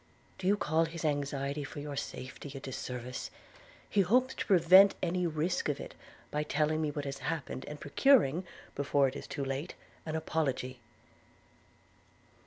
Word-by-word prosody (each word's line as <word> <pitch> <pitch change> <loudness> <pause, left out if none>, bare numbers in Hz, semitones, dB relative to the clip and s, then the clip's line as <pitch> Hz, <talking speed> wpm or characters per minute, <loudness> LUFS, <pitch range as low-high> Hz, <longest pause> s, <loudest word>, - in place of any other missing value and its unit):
'Do 185 - -2
you 205 +2 +4
call 160 -2 +2
his 165 0 -5
anxiety 145 -1 -1
for 145 - -7
your 145 0 -5
safety 135 +1 -6
a - - -4
disservice? 125 -1 -5 0.6
He 205 - +3
hopes 250 +7 +3
to - - -4
prevent 190 +2 +7
any 180 0 +1
risk 160 +1 -1
of 145 - -1
it, - - -7 0.4
by 150 - 0
telling 150 +1 +1
me 155 - 0
what 145 0 -4
has 140 0 -4
happened, 150 -4 -4
and 150 0 -7
procuring, 180 - +4 0.3
before 140 0 +2
it 130 - -5
is - - -7
too 140 - -3
late, 135 +6 -3 0.3
an 155 - -2
apology.' 135 -5 -1
150 Hz, 160 wpm, -32 LUFS, 140-170 Hz, 0.6 s, prevent